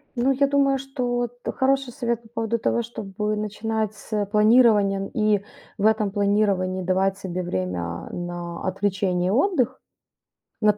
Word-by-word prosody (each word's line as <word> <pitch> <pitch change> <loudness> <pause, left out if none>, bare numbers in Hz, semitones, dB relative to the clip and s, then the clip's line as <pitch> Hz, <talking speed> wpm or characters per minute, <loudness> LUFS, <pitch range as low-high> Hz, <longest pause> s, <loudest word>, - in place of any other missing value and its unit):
Ну, 250 +2 +2
я 275 +1 +3
думаю, 275 -1 +3
что 270 -1 -4
вот 245 0 -1 0.2
хороший 270 -1 +1
совет 235 -3 -2
по 225 - -18
поводу 225 0 -1
того, 235 - +1
чтобы 210 -2 -3
начинать 215 0 -2
с 210 0 -3
планирования 210 -3 +4
и 210 -2 +2 0.3
в 210 - 0
этом 215 -2 +3
планировании 200 -2 +1
давать 190 +1 +1
себе 185 -2 -4
время 90 - -3
на 175 -1 -5
отвлечение 190 -2 0
и - - +1
отдых. 260 - +1 0.8
Нап 210 -1 +4
210 Hz, 145 wpm, -24 LUFS, 195-235 Hz, 0.8 s, планирования